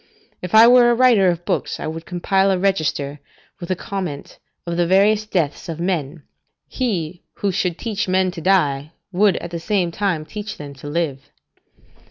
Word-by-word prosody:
If 180 +3 -2
I 220 +1 +9
were 245 0 +6
a 240 - +3
writer 235 -6 +5
of 175 0 -3
books, - - -2
I - - -5
would 160 +1 -6
compile 190 +2 +1
a 190 - +2
register, 155 -7 -1 0.4
with 175 - -8
a 185 - +1
comment, 180 -6 -6 0.3
of 170 -1 -3
the 175 0 +1
various 205 +3 +3
deaths 170 -3 -2
of 165 -1 -5
men: 170 -4 -2 0.4
he 180 -9 -3
who 200 - -1
should 180 -1 -1
teach 215 -5 -3
men 185 0 +2
to 170 - -8
die 155 -5 +1 0.2
would 200 +1 +3
at 170 - -7
the 170 - -4
same 180 -1 0
time 175 -4 -1
teach 210 +3 -7
them 145 -1 -8
to 140 +1 -11
live. 145 -3 -3
180 Hz, 185 wpm, -20 LUFS, 160-200 Hz, 0.4 s, I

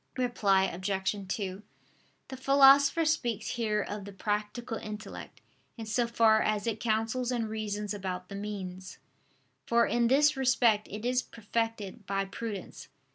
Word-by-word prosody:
Reply 210 -6 +2
Obj. 190 +2 -1
2: 190 0 -3 0.7
The 265 - -6
Philosopher 275 +4 +5
speaks 240 -9 0
here 215 -3 0
of 205 0 -5
the 200 - -8
practical 210 +4 -3
intellect, 215 0 -8 0.4
in 225 - -6
so 235 +2 0
far 225 -2 +4
as 210 -1 0
it 225 -2 -2
counsels 225 +3 0
and 235 -3 -1
reasons 210 -1 -3
about 185 -2 -5
the 200 - -10
means: 190 -2 -6 0.7
for 235 0 +4
in 235 0 +2
this 295 +4 +4
respect 245 -5 +3
it 210 +3 -6
is 250 +1 +2
perfected 225 -3 -4
by 195 0 0
prudence. 205 0 -7
220 Hz, 140 wpm, -30 LUFS, 200-240 Hz, 0.7 s, Philosopher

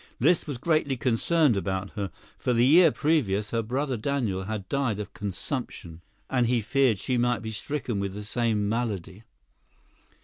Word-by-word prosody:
Liszt 160 +7 +3
was 145 -4 -4
greatly 150 -1 +1
concerned 135 +3 +2
about 95 0 -2
her, 100 -3 -4 0.3
for 125 - -1
the 120 +1 +4
year 165 +5 +7
previous 110 -12 +1
her 115 - +1
brother 130 +3 -2
Daniel 110 -7 -1
had 105 -2 -4
died 130 -6 0
of 105 -1 -6
consumption, 100 - -5 0.3
and 125 -3 +1
he 120 0 +2
feared 120 +1 +2
she 125 +5 -1
might 120 -1 +1
be 110 - -4
stricken 120 0 -3
with 100 -1 -3
the 105 - -6
same 110 -1 0
malady. 105 -4 -3
115 Hz, 165 wpm, -27 LUFS, 100-135 Hz, 0.3 s, year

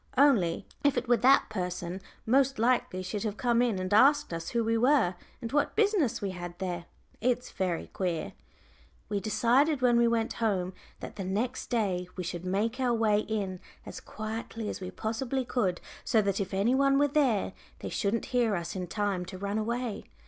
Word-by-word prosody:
Only 230 -12 +4 0.2
if 285 -3 +3
it 245 0 -1
were 240 0 +4
that 260 +5 +5
person, 180 -1 -4 0.2
most 270 +3 +3
likely 240 -5 +1
she'd 200 +2 -4
have 215 -1 -3
come 240 -1 +2
in 235 -5 +1
and 185 +2 -2
asked 270 - +5
us 165 0 -4
who 235 -1 0
we 225 +1 +1
were, 245 -5 +3 0.3
and 230 - -4
what 290 +1 +1
business 405 - +2
we 195 - -1
had 175 -1 -7
there; 180 -3 -4 0.4
it's 250 +1 0
very 180 -3 -2
queer." 175 -4 -3 0.8
We 205 -1 0
decided 255 - +2
when 240 -1 +5
we 235 - +4
went 230 -1 0
home 190 -5 0 0.3
that - - -8
the 195 - -3
next 205 +7 -2
day 195 -7 0
we 185 - -4
should 175 0 -5
make 215 +7 -1
our 250 -2 +2
way 215 -2 +3
in 200 -4 -3 0.3
as - - -7
quietly 220 0 -5
as - - -5
we 185 - -4
possibly 235 +6 -2
could, 200 -8 0 0.2
so 225 - +3
that 200 -1 +1
if 195 - -4
any 200 +5 +2
one 275 +1 +4
were 290 +1 +4
there, 270 -8 +1 0.3
they - - -4
shouldn't 215 +2 -1
hear 235 -4 +3
us 170 0 -4
in 180 -1 -3
time 200 -2 -1
to 185 +1 -8
run 200 +2 -2
away. 235 0 -3
220 Hz, 190 wpm, -29 LUFS, 185-245 Hz, 0.8 s, that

